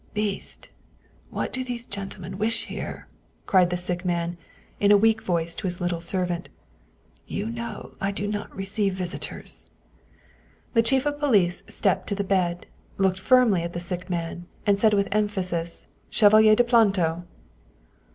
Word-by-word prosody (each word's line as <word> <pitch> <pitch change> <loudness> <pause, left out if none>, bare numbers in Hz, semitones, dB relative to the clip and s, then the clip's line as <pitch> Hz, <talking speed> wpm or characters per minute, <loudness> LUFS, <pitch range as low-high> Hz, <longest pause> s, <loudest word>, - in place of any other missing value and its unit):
" - - -32
Beast, 210 -2 -2 0.6
what - - -3
do 260 - -1
these 240 -2 -5
gentlemen 195 -2 -6
wish 225 +2 0
here? - - -6 0.2
" - - -38
cried 185 -2 +4
the 180 - -1
sick 175 0 -2
man 175 -1 -1 0.4
in 205 0 +4
a 205 - +8
weak 220 +1 +3
voice 170 -2 -1
to 195 - -4
his 180 -1 -3
little 175 -1 -1
servant. 175 0 -2 0.4
" - - -35
You 210 +3 -2
know 230 -2 -6
I 195 - +1
do 200 +1 -3
not 205 0 -4
receive 195 0 -1
visitors." 185 0 -5 1.0
The 230 - +5
chief 265 +4 +2
of 290 0 -1
police 205 -12 +3
stepped 195 - 0
to 200 - -1
the 200 - -1
bed, 180 -3 0 0.3
looked 190 -1 +2
firmly 240 -4 +4
at 170 0 -4
the 175 - -3
sick 180 +1 -4
man, 175 0 -4 0.2
and 200 -1 +3
said 215 0 +4
with 200 0 +2
emphasis, 185 -5 -1
" - - -37
Chevalier 215 0 +6
de 245 - +4
Planto!" 195 -8 +3
195 Hz, 170 wpm, -25 LUFS, 175-215 Hz, 1.0 s, a